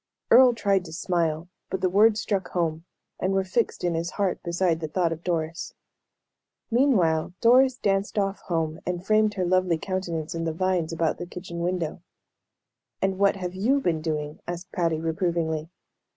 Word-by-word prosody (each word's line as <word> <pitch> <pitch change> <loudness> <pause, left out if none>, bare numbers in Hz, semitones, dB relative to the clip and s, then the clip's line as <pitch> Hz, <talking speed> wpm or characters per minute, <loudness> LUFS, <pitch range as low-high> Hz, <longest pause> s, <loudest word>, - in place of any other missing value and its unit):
Earle 255 -2 +7
tried 195 -4 +1
to 160 - -9
smile, 165 -2 -1 0.2
but 190 - -3
the 185 - +3
words 210 +4 +4
struck 195 -4 -1
home, 165 -2 -2 0.3
and 190 +1 0
were 195 0 +2
fixed 200 +5 -1
in 175 -1 +1
his 165 +1 -2
heart 200 -3 0
beside 170 -1 0
the 160 - -3
thought 170 +1 0
of 165 +1 -5
Doris. 165 -1 -3 1.0
Meanwhile 185 - +2
Doris 255 +2 +5
danced 195 0 0
off 195 -1 0
home, 160 -2 -2
and 180 0 -4
framed 215 0 +3
her 185 -3 0
lovely 185 -1 +2
countenance 170 -3 -3
in 165 0 -3
the 165 -1 -1
vines 180 -1 0
about 165 -1 -1
the 175 - -5
kitchen 175 -1 -7
window. 175 -2 -2 1.0
"And 190 0 -1
what 200 0 +4
have 180 -2 -5
you 230 +9 +2
been 165 - 0
doing?" 150 -2 -3
asked 175 +1 -6
Patty, 165 -3 0
reprovingly. 160 -1 -1
180 Hz, 170 wpm, -25 LUFS, 165-195 Hz, 1.0 s, Earle